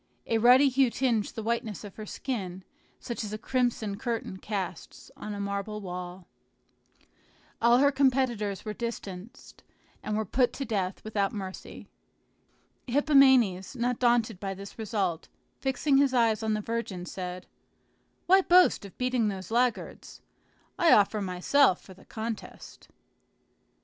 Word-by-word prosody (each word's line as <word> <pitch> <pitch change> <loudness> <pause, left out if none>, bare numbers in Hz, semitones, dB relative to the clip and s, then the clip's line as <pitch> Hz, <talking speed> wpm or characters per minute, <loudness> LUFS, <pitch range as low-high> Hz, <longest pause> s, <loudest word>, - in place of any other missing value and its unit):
A 225 - +1
ruddy 250 +5 +6
hue 265 -1 +3
tinged 235 -4 -1
the 220 - -5
whiteness 225 -3 -2
of 205 -2 -10
her 215 -1 -8
skin, 190 -9 -5 0.4
such 235 -1 -5
as 210 0 -6
a - - -3
crimson 225 -4 -1
curtain 230 -5 -3
casts 190 -4 -6
on 210 -1 -6
a - - -6
marble 200 +1 -3
wall. 180 -1 -7 1.4
All 235 +1 +5
her 280 +2 +4
competitors 255 -7 0
were 215 - -3
distanced, 230 0 -8 0.4
and 215 0 -2
were 220 - -1
put 245 +5 +1
to 275 - -4
death 195 -5 -2
without 205 -2 -1
mercy. 190 -3 -8 1.0
Hippomenes, 265 - +4
not 245 0 -1
daunted 240 -6 +2
by 195 -1 -4
this 200 +3 -11
result, 195 -7 -2 0.3
fixing 270 +1 +1
his 275 -2 +3
eyes 230 -3 +3
on 220 -1 0
the 215 - -2
virgin, 210 -5 -4
said, 180 0 -6 0.8
"Why 380 +2 +6
boast 360 - +4
of 195 - -13
beating 250 -3 +1
those 195 0 -5
laggards? 240 0 -2 0.6
I 340 - +5
offer 210 +1 +3
myself 185 +5 +2
for 190 - -14
the 190 - -19
contest." 220 0 -7
220 Hz, 140 wpm, -28 LUFS, 195-250 Hz, 1.4 s, ruddy